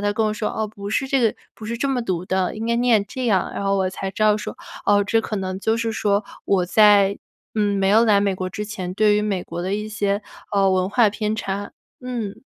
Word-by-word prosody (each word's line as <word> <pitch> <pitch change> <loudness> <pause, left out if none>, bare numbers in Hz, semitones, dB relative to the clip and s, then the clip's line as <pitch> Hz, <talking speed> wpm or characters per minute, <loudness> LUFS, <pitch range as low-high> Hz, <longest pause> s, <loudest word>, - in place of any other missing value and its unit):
他 205 0 0
跟 220 0 +1
我 210 - 0
说： 210 0 -2
“哦， 220 0 -2
不 200 -1 -8
是 270 +4 0
这 270 -1 +1
个 225 -2 +3 0.2
不 220 - -11
是 230 +1 -4
这 275 - 0
么 250 -3 0
读 180 -5 -2
的， 185 0 0
应 225 +1 -4
该 235 - +1
念 235 -4 +3
这 255 +4 -4
样。” 195 -4 +2
然 - - -3
后 195 0 +1
我 190 -1 +1
才 190 +1 -5
知 215 - -1
道 210 -1 +5
说， 210 - -6 0.3
哦， 205 0 +4
这 225 +3 +2
可 215 - -4
能 185 -1 -3
就 220 +2 +1
是 230 -1 -1
说， 205 -1 +1 0.2
我 185 -3 +2
在， 205 0 +5 0.4
嗯， 205 -2 +1
没 195 0 +2
有 225 +3 +5
来 205 -3 +4
美 200 -1 +1
国 185 0 -4
之 210 - -4
前， 190 -4 -5
对 210 0 +4
于 210 - +1
美 195 -4 -2
国 170 +1 -5
的 185 +2 -2
一 210 +1 -4
些， 205 -1 -1 0.4
嗯， 195 -1 +4
文 185 +1 +1
化 220 +1 +4
偏 215 +1 -2
差， 200 -1 -4 0.3
嗯。 240 -4 -5
205 Hz, 270 characters per minute, -22 LUFS, 195-220 Hz, 0.4 s, 道